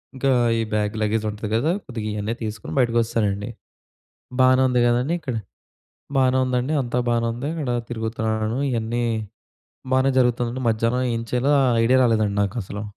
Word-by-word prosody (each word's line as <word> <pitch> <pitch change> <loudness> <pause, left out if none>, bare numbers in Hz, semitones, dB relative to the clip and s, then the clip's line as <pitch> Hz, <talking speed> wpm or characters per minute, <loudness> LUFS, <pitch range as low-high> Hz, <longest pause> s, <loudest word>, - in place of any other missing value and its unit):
ఇంకా 135 +1 0 0.3
ఈ - - +1
bag, 105 -1 0
luggage 110 +1 0
ఉంటది 105 0 -6
కదా! 140 +9 +2
కొద్దిగా 115 -4 -5
ఇయన్నీ 105 +2 -2
తీసుకొని 105 0 -5
బయటకొచ్చెశానండి. 115 -3 +1 0.9
బానే 130 0 +5
ఉంది 125 -1 +2
కదా! 120 0 +3
అని 160 +5 -1
ఇక్కడ 135 -6 -4 0.8
బానే 130 -1 +3
ఉందండి. 125 +3 -1
అంతా 120 -1 -3
బానే 115 0 +1
ఉంది. 125 +4 -5
ఇక్కడ 155 -6 -3 0.2
తిరుగుతున్నాను 110 0 -2
ఇయన్నీ 115 0 -1 0.9
బానే 130 +1 +3
జరుగుతుందండి. 125 0 0
మధ్యాహ్నం 115 +3 +1
ఏం 115 - -2
చెయ్యాలో 125 +3 +1
ఆ - - +3 0.2
ఐడియా 125 +3 +4
రాలేదండి 110 -4 +2
నాకసలు. 100 0 -4
115 Hz, 150 wpm, -23 LUFS, 110-125 Hz, 0.9 s, బానే